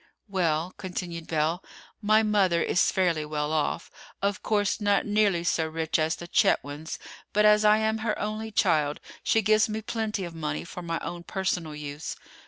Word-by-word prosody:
"Well," 175 -3 0
continued 175 -3 -5
Belle, 160 +3 0 0.4
"my 215 +1 +4
mother 195 -5 +3
is 185 - +2
fairly 175 -5 +1
well 150 0 -2
off—of 195 +5 -3
course 205 0 0
not 205 -1 +2
nearly 205 -4 +2
so 165 -2 +1
rich 160 0 -1
as 160 +1 +1
the 175 - -9
Chetwynds; 160 -5 +1 0.4
but 210 +1 +4
as 210 0 +6
I 210 0 +6
am 220 0 0
her 220 -1 -1
only 215 +1 -3
child, 155 -8 +2 0.2
she 225 - +2
gives 215 +2 +4
me 215 +1 -3
plenty 220 -2 -2
of 170 - -8
money 155 -2 -3
for 180 +1 -8
my 165 -1 -2
own 175 0 -5
personal 175 -4 -2
use. 150 0 -6
180 Hz, 170 wpm, -27 LUFS, 160-210 Hz, 0.4 s, as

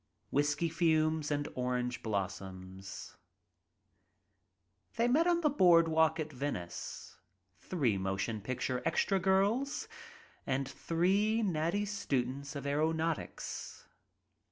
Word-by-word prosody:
Whiskey 145 +4 +1
Fumes 155 -2 +2
I 145 0 +1
Orange 125 -1 -1
Blossoms 95 -2 -5 1.1
« 95 0 -48
HEY 235 - +3
met 305 +8 +4
on 345 -1 +3
the 305 - +3
broad 175 - +6
walk 160 0 +3
at 155 -1 -3
Venice 125 -10 -5 0.2
— 90 0 -40
three 130 - 0
motion 95 +3 -2
picture 125 +2 -2
"extra 195 -1 +2
girls" 200 +9 +1 0.6
and 135 0 0
three 195 +10 +1
natty 175 +2 0
students 140 -8 -2
of 140 -1 -5
aeronautics. 160 +3 -2
150 Hz, 105 wpm, -33 LUFS, 120-175 Hz, 1.1 s, broad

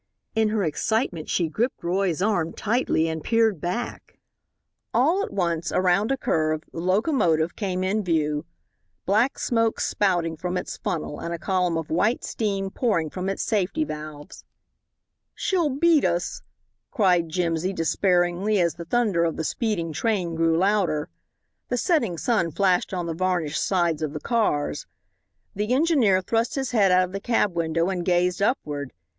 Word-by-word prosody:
In 220 -1 +2
her 215 -1 0
excitement 175 - -1
she 170 - +1
gripped 230 +11 -2
Roy's 180 0 0
arm 175 -6 0
tightly 215 -7 0
and 160 -1 -4
peered 225 -6 +2
back. 180 +8 -4 0.8
All 315 +11 +3
at - - -5
once, 170 -4 -1
around 185 +5 +2
a 270 - +1
curve, 155 -10 0
the - - -5
locomotive 180 - +1
came 185 -3 -2
into 200 +3 0
view 155 -4 0 0.6
black 220 +7 +2
smoke 230 -2 0
spouting 175 -5 0
from 180 +2 -3
its 180 - -4
funnel 155 -3 -3
and 170 - -5
a - - -6
column 180 0 0
of 160 -2 -5
white 205 +9 +1
steam 195 -3 -2
pouring 170 - 0
from 185 +1 -3
its 195 - -2
safety 215 - 0
valves. 150 - -8 0.9
"She'll 355 -6 +1
beat 305 +3 +3
us," 175 -1 -1 0.5
cried 180 -6 +2
Jimsy, 170 +1 -1
despairingly, 180 +3 +1
as 170 -2 +2
the 170 - -8
thunder 205 -4 +1
of 165 -1 -1
the 160 - -2
speeding 170 -4 -2
train 185 -3 -1
grew 165 0 +2
louder. 185 -5 +1 0.6
The 245 - 0
setting 240 - +1
sun 205 -4 +1
flashed 185 +2 +1
on 180 -2 -2
the 165 - -3
varnished 175 -3 -1
sides 170 -5 +1
of 155 -2 -2
the 150 - -4
cars. 215 -9 0 0.7
The 210 +5 0
engineer 265 - +3
thrust 225 +4 0
his 265 -2 -2
head 205 -6 +4
out 185 0 +5
of 180 - -4
the 195 - -4
cab 220 -5 +1
window 165 0 0
and 180 -2 -2
gazed 180 +1 +1
upward. 145 - -1
185 Hz, 160 wpm, -24 LUFS, 165-220 Hz, 0.9 s, out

